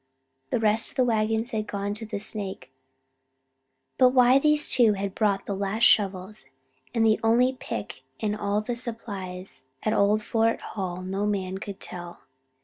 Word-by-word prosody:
The -, -, 0 dB
rest 220 Hz, 0 st, +2 dB
of -, -, -14 dB
the 255 Hz, -, +3 dB
wagons 225 Hz, 0 st, 0 dB
had 215 Hz, -1 st, -2 dB
gone 200 Hz, -1 st, -4 dB
on -, -, -1 dB
to 220 Hz, +1 st, -7 dB
the 210 Hz, -, -4 dB
Snake. 200 Hz, -, -5 dB, 1.3 s
But 255 Hz, 0 st, +5 dB
why 250 Hz, +1 st, +6 dB
these 300 Hz, +1 st, +3 dB
two 235 Hz, -4 st, +4 dB
had 195 Hz, -1 st, -3 dB
bought 200 Hz, -3 st, 0 dB
the 200 Hz, -, -3 dB
last 200 Hz, +3 st, -2 dB
shovels 195 Hz, -5 st, +2 dB, 0.4 s
and 225 Hz, -1 st, +2 dB
the 220 Hz, -1 st, +3 dB
only 240 Hz, +3 st, +4 dB
pick 105 Hz, +4 st, -6 dB, 0.2 s
in 210 Hz, -1 st, -1 dB
all 205 Hz, 0 st, -1 dB
the 240 Hz, +3 st, -3 dB
supplies 200 Hz, -, -6 dB, 0.2 s
at 215 Hz, -, +1 dB
old 210 Hz, +2 st, +3 dB
Fort 225 Hz, +1 st, +1 dB
Hall 185 Hz, -3 st, -5 dB
no 195 Hz, +2 st, -2 dB
man 190 Hz, -2 st, -2 dB
could 200 Hz, -1 st, -7 dB
tell. 175 Hz, -1 st, -8 dB
210 Hz, 170 wpm, -26 LUFS, 195-225 Hz, 1.3 s, why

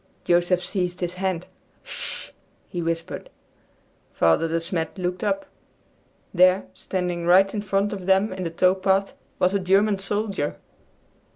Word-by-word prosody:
Joseph 175 Hz, +1 st, +2 dB
seized 180 Hz, -1 st, -2 dB
his 175 Hz, 0 st, -2 dB
hand. 185 Hz, -2 st, -2 dB, 0.4 s
"Hush!" -, -, -5 dB, 0.3 s
he 175 Hz, -, -4 dB
whispered. 165 Hz, 0 st, -3 dB, 0.8 s
Father 85 Hz, -, +3 dB
De 165 Hz, +1 st, 0 dB
Smet 165 Hz, +1 st, -3 dB
looked 180 Hz, +1 st, -2 dB
up. 195 Hz, -2 st, 0 dB, 0.9 s
There, 185 Hz, +1 st, +5 dB
standing 180 Hz, -2 st, -3 dB
right 190 Hz, +2 st, +5 dB
in 210 Hz, -, -2 dB
front 200 Hz, 0 st, 0 dB
of 190 Hz, -2 st, -6 dB
them 195 Hz, +2 st, +3 dB
in 185 Hz, -, -6 dB
the 170 Hz, -, -2 dB
tow 180 Hz, +3 st, +3 dB
path, 195 Hz, +1 st, +1 dB, 0.2 s
was 180 Hz, +1 st, +2 dB
a 200 Hz, -, +2 dB
German 195 Hz, +2 st, +3 dB
soldier! 195 Hz, -5 st, -2 dB
185 Hz, 145 wpm, -24 LUFS, 175-195 Hz, 0.9 s, There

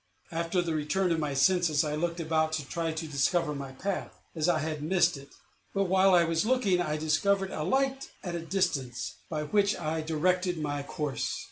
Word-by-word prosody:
After 170 Hz, +2 st, 0 dB
the 165 Hz, -2 st, -2 dB
return 170 Hz, +5 st, 0 dB
of 165 Hz, -, +1 dB
my 145 Hz, -3 st, -2 dB
senses, 165 Hz, +1 st, +3 dB
I 150 Hz, -1 st, -2 dB
looked 170 Hz, +2 st, -2 dB
about 160 Hz, -1 st, +1 dB
to 150 Hz, -4 st, -2 dB
try 165 Hz, +1 st, -2 dB
to 160 Hz, 0 st, -4 dB
discover 150 Hz, +2 st, +1 dB
my 140 Hz, -2 st, -6 dB
path, 195 Hz, +8 st, -4 dB
as 160 Hz, +1 st, 0 dB
I 170 Hz, -, +3 dB
had 155 Hz, 0 st, -3 dB
missed 175 Hz, +1 st, +3 dB
it; 140 Hz, 0 st, -11 dB, 0.5 s
but, 195 Hz, -, +3 dB
while 190 Hz, 0 st, +4 dB
I 175 Hz, -, +6 dB
was 165 Hz, -1 st, +1 dB
looking, 215 Hz, -7 st, +2 dB
I 155 Hz, -3 st, -1 dB
discovered 190 Hz, +6 st, +1 dB
a -, -, -4 dB
light 270 Hz, -, 0 dB
at 175 Hz, -, -4 dB
a 170 Hz, -, -2 dB
distance, 165 Hz, -9 st, -1 dB
by 155 Hz, -2 st, -2 dB
which 200 Hz, +6 st, +2 dB
I 160 Hz, +1 st, -2 dB
directed 180 Hz, +3 st, +1 dB
my 145 Hz, -2 st, -2 dB
course. 140 Hz, 0 st, -3 dB
165 Hz, 200 wpm, -29 LUFS, 150-185 Hz, 0.5 s, I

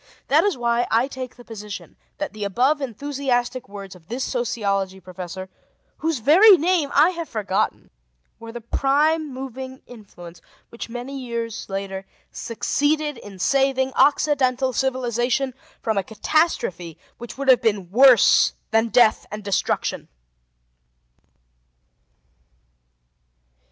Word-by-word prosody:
That -, -, +5 dB
is 405 Hz, -8 st, 0 dB
why 235 Hz, 0 st, +1 dB
I 230 Hz, +4 st, +2 dB
take 260 Hz, -2 st, -7 dB
the 245 Hz, -, -15 dB
position 210 Hz, -2 st, -8 dB, 0.2 s
that 300 Hz, -, -4 dB
the 215 Hz, -1 st, -6 dB
above 255 Hz, +9 st, +1 dB
enthusiastic 255 Hz, -2 st, -2 dB
words 200 Hz, -1 st, -9 dB
of 170 Hz, -3 st, -18 dB
this 245 Hz, +5 st, -3 dB
sociology 200 Hz, -6 st, -2 dB
professor, 185 Hz, 0 st, -8 dB, 0.5 s
whose 320 Hz, -1 st, -1 dB
very 355 Hz, -, +7 dB
name 335 Hz, -2 st, +1 dB
I 310 Hz, +5 st, +6 dB
have 335 Hz, -2 st, -6 dB
forgotten, 200 Hz, -4 st, -2 dB, 0.5 s
were 230 Hz, 0 st, -9 dB
the 240 Hz, 0 st, -8 dB
prime 295 Hz, +6 st, +1 dB
moving 260 Hz, 0 st, -7 dB
influence 185 Hz, -7 st, -13 dB, 0.3 s
which 235 Hz, -, -8 dB
many 250 Hz, +4 st, -6 dB
years 235 Hz, -4 st, -5 dB
later 195 Hz, 0 st, -5 dB, 0.2 s
succeeded 290 Hz, +4 st, -1 dB
in 200 Hz, -3 st, -11 dB
saving 265 Hz, +4 st, +1 dB
Occidental 265 Hz, -3 st, +2 dB
civilization 255 Hz, 0 st, 0 dB, 0.3 s
from 220 Hz, -3 st, +1 dB
a -, -, -2 dB
catastrophe 195 Hz, -, -1 dB, 0.2 s
which 240 Hz, +1 st, -9 dB
would 275 Hz, 0 st, -4 dB
have 260 Hz, -2 st, +6 dB
been 205 Hz, -6 st, -1 dB
worse 255 Hz, +2 st, +6 dB, 0.2 s
than 225 Hz, 0 st, +3 dB
death 235 Hz, -2 st, +4 dB
and 210 Hz, 0 st, -7 dB
destruction. 200 Hz, -2 st, -1 dB
245 Hz, 120 wpm, -22 LUFS, 210-275 Hz, 0.5 s, very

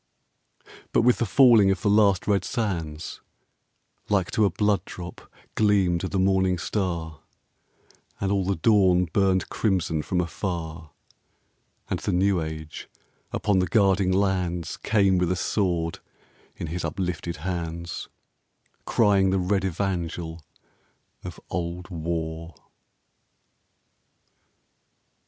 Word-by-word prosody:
But -, -, +4 dB
with 125 Hz, 0 st, +4 dB
the 120 Hz, -, 0 dB
falling 115 Hz, -3 st, +6 dB
of 95 Hz, -, -1 dB
the -, -, +1 dB
last 100 Hz, -3 st, +4 dB
red 100 Hz, -3 st, +2 dB
sands, 85 Hz, -, -3 dB, 0.9 s
Like 100 Hz, -4 st, +1 dB
to 110 Hz, -, +3 dB
a -, -, +3 dB
blood 100 Hz, +1 st, +1 dB
drop 85 Hz, -4 st, -10 dB, 0.2 s
gleamed 95 Hz, -5 st, +2 dB
the 95 Hz, +1 st, -2 dB
morning 95 Hz, -1 st, +2 dB
star; 85 Hz, -5 st, -3 dB, 1.0 s
And 100 Hz, 0 st, -1 dB
all 100 Hz, -1 st, +1 dB
the 95 Hz, +1 st, 0 dB
dawn 90 Hz, -1 st, +4 dB
burned 95 Hz, -2 st, +2 dB
crimson 90 Hz, -7 st, 0 dB
from 90 Hz, +4 st, -1 dB
afar; 85 Hz, -2 st, -4 dB, 1.0 s
And -, -, -2 dB
the -, -, -2 dB
new 95 Hz, 0 st, +2 dB
age 80 Hz, -1 st, -7 dB, 0.4 s
upon 100 Hz, -3 st, +1 dB
the 90 Hz, -, +1 dB
guarding 95 Hz, -3 st, +3 dB
lands 90 Hz, -3 st, 0 dB
Came 100 Hz, -4 st, +2 dB
with 90 Hz, 0 st, +1 dB
a -, -, +1 dB
sword 85 Hz, -3 st, -1 dB, 0.6 s
in -, -, -4 dB
his 85 Hz, +2 st, -4 dB
uplifted 85 Hz, +1 st, -3 dB
hands, 85 Hz, -3 st, -4 dB, 0.8 s
Crying 100 Hz, -4 st, +3 dB
the 95 Hz, -, +1 dB
red 95 Hz, +1 st, 0 dB
evangel 85 Hz, -3 st, -3 dB, 0.8 s
of -, -, -8 dB
old 85 Hz, +1 st, -4 dB
War. 80 Hz, -1 st, -4 dB
90 Hz, 115 wpm, -25 LUFS, 85-100 Hz, 1.0 s, falling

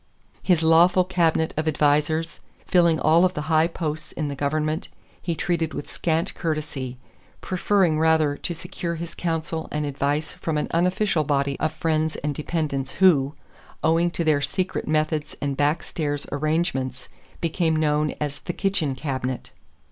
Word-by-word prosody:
His 175 Hz, -4 st, +2 dB
lawful 175 Hz, +3 st, +5 dB
cabinet 170 Hz, -3 st, +1 dB
of 155 Hz, +1 st, -1 dB
advisers, 155 Hz, +2 st, +1 dB, 0.3 s
filling 170 Hz, -3 st, +4 dB
all 160 Hz, +3 st, +5 dB
of 185 Hz, 0 st, +2 dB
the 150 Hz, -, -2 dB
high 160 Hz, +1 st, +5 dB
posts 155 Hz, -2 st, -4 dB
in 150 Hz, -2 st, -3 dB
the 140 Hz, -, -4 dB
government, 155 Hz, +3 st, -1 dB, 0.3 s
he 170 Hz, -2 st, -2 dB
treated 165 Hz, -2 st, -1 dB
with -, -, -5 dB
scant 165 Hz, 0 st, -1 dB
courtesy, 150 Hz, -6 st, -3 dB, 0.4 s
preferring 185 Hz, -3 st, +1 dB
rather 160 Hz, -2 st, +3 dB
to 170 Hz, -, -4 dB
secure 170 Hz, +1 st, -4 dB
his 165 Hz, 0 st, -6 dB
counsel 160 Hz, -1 st, -2 dB
and 150 Hz, 0 st, -1 dB
advice 145 Hz, +2 st, -1 dB
from 160 Hz, -2 st, -2 dB
an 150 Hz, -, -1 dB
unofficial 180 Hz, 0 st, +2 dB
body 140 Hz, -1 st, 0 dB
of 155 Hz, 0 st, 0 dB
friends 155 Hz, 0 st, 0 dB
and 150 Hz, 0 st, 0 dB
dependents 145 Hz, -3 st, -2 dB
who, 155 Hz, -7 st, +4 dB, 0.5 s
owing 165 Hz, +2 st, +3 dB
to 170 Hz, -, -2 dB
their 155 Hz, -3 st, +3 dB
secret 180 Hz, +6 st, -2 dB
methods 155 Hz, 0 st, 0 dB
and 140 Hz, -1 st, -2 dB
back 145 Hz, +4 st, +1 dB
stairs 145 Hz, -3 st, -3 dB
arrangements, 145 Hz, -4 st, -1 dB, 0.3 s
became 165 Hz, -1 st, +1 dB
known 150 Hz, -1 st, +1 dB
as 145 Hz, -1 st, -3 dB
"the 175 Hz, -, -5 dB
kitchen 175 Hz, -9 st, 0 dB
cabinet." 130 Hz, -3 st, -4 dB
155 Hz, 155 wpm, -24 LUFS, 145-165 Hz, 0.5 s, lawful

